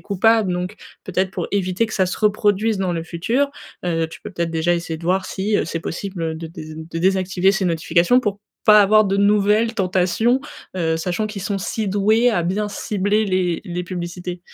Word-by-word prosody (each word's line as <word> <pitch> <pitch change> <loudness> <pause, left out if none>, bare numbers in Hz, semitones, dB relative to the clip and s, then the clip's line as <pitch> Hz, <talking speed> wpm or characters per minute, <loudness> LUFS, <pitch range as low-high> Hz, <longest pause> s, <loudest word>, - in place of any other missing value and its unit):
coupable. 215 0 +2
Donc 180 +3 -3 0.3
peut-être 190 0 -1
pour - - -3
éviter 190 +2 +1
que 215 - -7
ça 190 - +3
se 180 - -4
reproduise 210 0 +2
dans 185 -2 0
le 165 -1 -3
futur, 230 +12 0 0.4
heu, 165 -2 0
tu - - -12
peux 210 - -8
peut-être 170 -3 -2
déjà 165 +1 +1
essayer 170 -1 -3
de 165 - -11
voir 185 +2 +1
si, 205 +3 -1
heu, - - +1
c'est 165 0 -3
possible 165 -2 -4
de 165 0 -7
dés 155 -2 -9
de 160 +1 -6
désactiver 190 +1 +2
ces 195 -1 -1
notifications, 170 +6 +3
pour 205 -5 -2 0.3
pas 210 0 +8
avoir 215 +2 +5
de 195 0 0
nouvelles 210 +3 +3
tentations, 195 +6 +1 0.3
heu, 165 -3 0
sachant 180 +6 -2
qu'ils 210 -2 -6
sont 200 +1 -2
si 215 +3 -3
doués 215 +5 +3
à 205 -6 0
bien 200 +5 -1
cibler 205 +1 0
les 185 -3 0
les 175 0 -4
publicités. 180 0 -5
190 Hz, 200 wpm, -21 LUFS, 175-210 Hz, 0.4 s, pas